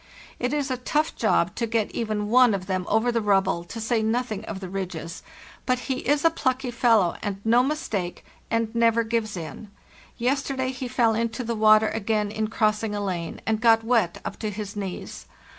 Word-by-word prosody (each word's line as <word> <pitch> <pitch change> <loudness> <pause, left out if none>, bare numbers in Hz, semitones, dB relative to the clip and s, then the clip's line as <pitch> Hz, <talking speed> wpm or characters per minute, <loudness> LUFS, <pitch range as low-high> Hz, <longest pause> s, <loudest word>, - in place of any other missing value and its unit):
It 250 +1 -1
is 290 -2 -1
a 255 - -1
tough 300 +5 0
job 190 -5 +2
to 230 - -2
get 225 -2 0
even 215 -2 -2
one 245 -3 +6
of 185 -1 -5
them 185 -1 -2
over 225 +3 +2
the 230 -1 0
rubble, 195 -4 +2
to 225 - -7
say 225 0 0
nothing 220 -1 -1
of 210 -4 -5
the 190 - -6
ridges; 180 -3 -5 0.5
but 255 -1 +3
he 255 +1 -3
is 290 +3 +1
a 330 - +6
plucky 260 -5 -1
fellow, 230 -7 +3
and 200 -2 -3
no 235 +2 +5
mistake, 225 - -3 0.2
and 230 -1 0
never 230 0 +3
gives 220 -3 -2
in. 165 +6 -7 0.5
Yesterday 260 +1 0
he 255 0 -5
fell 240 -2 +2
into 230 +2 -2
the 235 0 -2
water 215 0 +5
again 210 -1 -1
in 215 0 -1
crossing 215 -1 0
a - - -2
lane, 180 -5 -4
and 220 -1 0
got 225 -1 +5
wet 225 -7 +1
up - - -5
to 215 - -2
his 210 0 -6
knees. 195 -3 -6
225 Hz, 195 wpm, -25 LUFS, 205-245 Hz, 0.5 s, one